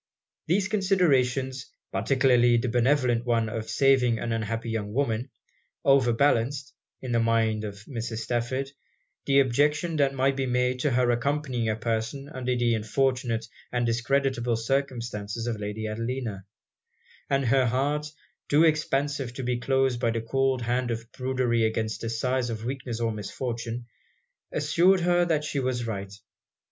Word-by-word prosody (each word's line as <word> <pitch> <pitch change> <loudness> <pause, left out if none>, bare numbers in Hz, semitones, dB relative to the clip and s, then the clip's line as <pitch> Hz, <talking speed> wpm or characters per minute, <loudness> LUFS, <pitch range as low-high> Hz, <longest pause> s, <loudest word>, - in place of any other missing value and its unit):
These 190 +3 +2
considerations, 135 - +1 0.2
particularly 120 +2 +3
the 120 +1 0
benevolent 125 0 +2
one 115 -2 +1
of 110 0 -5
saving 130 -4 +3
an 115 - -3
unhappy 115 +1 -2
young 105 -2 -3
woman, 125 -2 0 0.6
over 135 -3 +5
balanced, 135 +2 +1 0.3
in 130 - -4
the 115 - +2
mind 115 -1 +1
of 100 -1 -7
Mrs. 115 -3 -5
Stafford, 130 +3 -2 0.6
the 140 0 +5
objection 150 +6 +1
that 135 -2 +2
might 135 +1 +2
be 135 -1 -1
made 125 0 +1
to 145 - +1
her 125 -1 +2
accompanying 130 -2 -1
a 110 - +1
person 115 +5 -3
under 125 -4 -2
the 120 -1 +2
unfortunate 115 +1 0 0.3
and 125 -1 0
discreditable 120 +1 +1
circumstances 115 -3 -2
of 115 -3 -2
Lady 105 +1 -4
Adelina; 115 -2 -4 0.8
and 140 -1 +1
her 130 +1 +3
heart, 145 +5 0 0.4
too 150 +3 +5
expansive 145 -5 0
to 135 - -4
be 125 0 -1
closed 135 -1 +1
by 115 - +1
the 115 0 -1
cold 130 +2 0
hand 120 +1 0
of 115 0 -4
prudery 125 -3 0
against 110 0 -1
the 115 - -3
sighs 125 +2 -1
of 110 -1 -5
weakness 125 -2 -4
or 115 -1 0
misfortune, 115 +2 -4 0.7
assured 175 +5 +3
her 175 0 +3
that 155 -3 +1
she 150 -2 -2
was 125 -2 -1
right. 100 -3 -5
125 Hz, 150 wpm, -27 LUFS, 115-135 Hz, 0.8 s, over